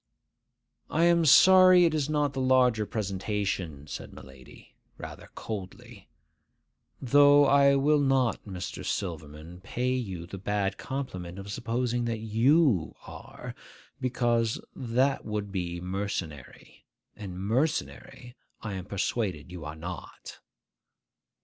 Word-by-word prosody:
'I 160 - +1
am 170 -1 +4
sorry 185 +3 +7
it 165 - +2
is 150 -2 -1
not 150 -2 0
the 135 - -3
larger 125 -4 +3
presentation,' 95 -7 -3
said 75 - -8
my - - -11
lady, 65 -1 -16 0.2
rather - - -10
coldly; 100 -4 -8 0.9
'though 145 +2 +6
I 140 0 +5
will 145 +2 +3
not, 135 -4 +1
Mr. 95 -3 -6
Silverman, 80 -2 -5
pay 125 +6 -2
you 95 -10 -4
the 95 +3 -9
bad 100 0 -2
compliment 95 -10 -5
of 100 +1 -8
supposing 120 +2 -2
that 115 -1 -2
you 115 - +2
are, - - -10 0.5
because 120 -3 0 0.2
that 130 +2 0
would 105 -2 -4
be 85 -2 -3
mercenary,—and 90 - -7
mercenary 125 +2 -2 0.3
I 105 -2 -4
am 95 -2 -6
persuaded 95 -5 -3
you 85 -4 -8
are 75 +1 -6
not. 85 0 -9
110 Hz, 120 wpm, -28 LUFS, 90-135 Hz, 0.9 s, sorry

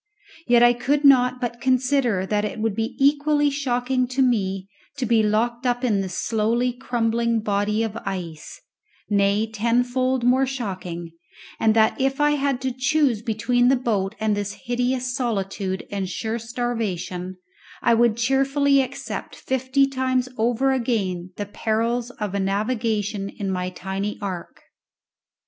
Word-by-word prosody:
Yet 240 -1 +5
I 240 0 +7
could 285 +4 0
not 255 -2 +5
but 240 -1 -4
consider 255 -5 +2
that 205 +1 0
it 210 - -3
would 220 -1 0
be 225 +2 -3
equally 290 +1 +3
shocking 255 -2 0
to 260 +2 +1
me 195 -6 0 0.3
to 265 - -1
be 230 -1 +3
locked 235 +4 0
up 245 +1 0
in 210 -6 +2
this 185 -2 -5
slowly 235 +3 0
crumbling 235 -2 0
body 210 +1 0
of 220 -1 -3
ice 180 -7 -6 0.5
nay, 200 +1 +3
tenfold 245 +3 0
more 260 +2 +3
shocking, 185 -9 -5 0.5
and 220 -1 +3
that, 220 +3 +3
if 270 +1 0
I 295 0 +4
had 280 -3 0
to 260 0 -1
choose 255 -2 +1
between 245 +2 +1
the 265 - +5
boat 215 -5 -1
and 215 -1 +1
this 205 0 -4
hideous 250 +1 -1
solitude 195 -5 -2
and 195 -2 -2
sure 220 +4 -3
starvation, 220 -6 -3 0.5
I 235 - +4
would 230 -1 +3
cheerfully 275 +3 +3
accept 265 +1 -5
fifty 260 +1 +1
times 260 -1 0
over 240 +4 +1
again 205 -9 -1
the 205 - -3
perils 230 +3 -1
of 210 -6 -5
a 200 - 0
navigation 210 0 -1
in 195 -1 -4
my 180 -1 -2
tiny 195 +3 -4
ark. 185 -4 -6
235 Hz, 150 wpm, -23 LUFS, 205-255 Hz, 0.5 s, I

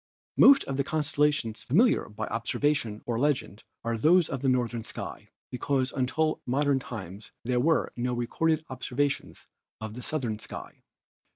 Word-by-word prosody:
Most 275 0 +8
of 135 - -4
the 140 - +2
constellations 150 -6 0
familiar 220 - +3
by 105 - -4
observation 115 -1 -1
or 115 -1 -1
legend 140 -6 0 0.2
are 115 0 -2
those 170 +6 +5
of 135 - -3
the 135 - +2
northern 120 -2 0
sky, - - -8 0.2
because 130 +1 0
until 135 +5 +1
within - - -7
modern 140 0 +2
times 105 -4 -8
there 125 +1 +1
were 160 +6 +2
no 125 0 -1
recorded 155 +6 0
observations 130 +2 -2 0.3
of 110 -1 -6
the 125 - -7
southern 120 -6 -2
heavens. - - -9
130 Hz, 155 wpm, -28 LUFS, 115-150 Hz, 0.3 s, Most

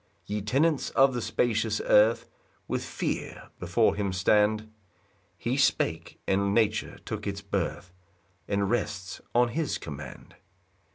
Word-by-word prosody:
5 - - -29
Ye 105 0 -1
tenants 135 +8 +1
of 135 0 +4
the 120 - -2
spacious 110 -1 0
earth, 110 +2 +4 0.4
With - - -2
fear - - -4
before - - +2
him 100 -2 -1
stand; 105 +3 +2 0.6
He 125 +3 -1
spake, 135 - +1
and 100 +1 +1
nature 110 -1 +1
took 105 -1 -4
its 100 0 -3
birth, 95 -2 -3 0.5
And 100 0 0
rests 100 -4 -2
on 120 0 +4
his 155 +4 -1
command. 70 -4 -9
105 Hz, 130 wpm, -28 LUFS, 100-120 Hz, 0.6 s, of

